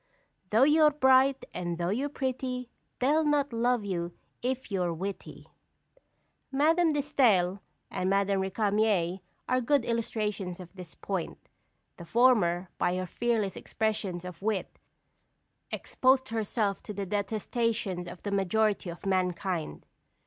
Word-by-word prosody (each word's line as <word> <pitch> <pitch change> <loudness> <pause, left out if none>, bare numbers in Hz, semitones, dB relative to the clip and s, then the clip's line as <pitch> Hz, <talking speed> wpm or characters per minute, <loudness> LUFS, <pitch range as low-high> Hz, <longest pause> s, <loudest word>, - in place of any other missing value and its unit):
"Though 225 +4 +5
you're 305 +2 +6
bright, 265 -2 +4
and 175 -1 -3
though 175 +1 -1
you're 265 +7 -1
pretty, 255 -3 -3 0.3
They'll 295 +5 +3
not 290 -3 +1
love 235 -1 +1
you 175 -3 -3 0.3
if 255 -2 -3
you're 180 -3 0
witty." 190 +4 -6 1.1
Madame 320 +5 +3
de 295 -1 +1
Staël 210 -11 +3 0.3
and 185 - -1
Madame 195 0 +2
Récamier 200 -2 +1 0.3
are 255 0 +2
good 265 0 +2
illustrations 210 -5 -2
of 180 -1 -11
this 180 -3 -10
point. 190 -4 -5 0.5
The 170 - -9
former, 190 -5 +3
by 180 - +1
her 185 0 -2
fearless 220 -1 -1
expressions 205 -5 -2
of 180 -1 -8
wit, 210 -1 -2 0.9
exposed 260 0 +2
herself 215 -2 -1
to 210 - -8
the 200 0 -3
detestation 205 -2 -1
of 175 - -11
the 205 - -3
majority 200 0 +1
of 170 +3 -9
mankind. 180 - -1
210 Hz, 130 wpm, -29 LUFS, 185-255 Hz, 1.1 s, you're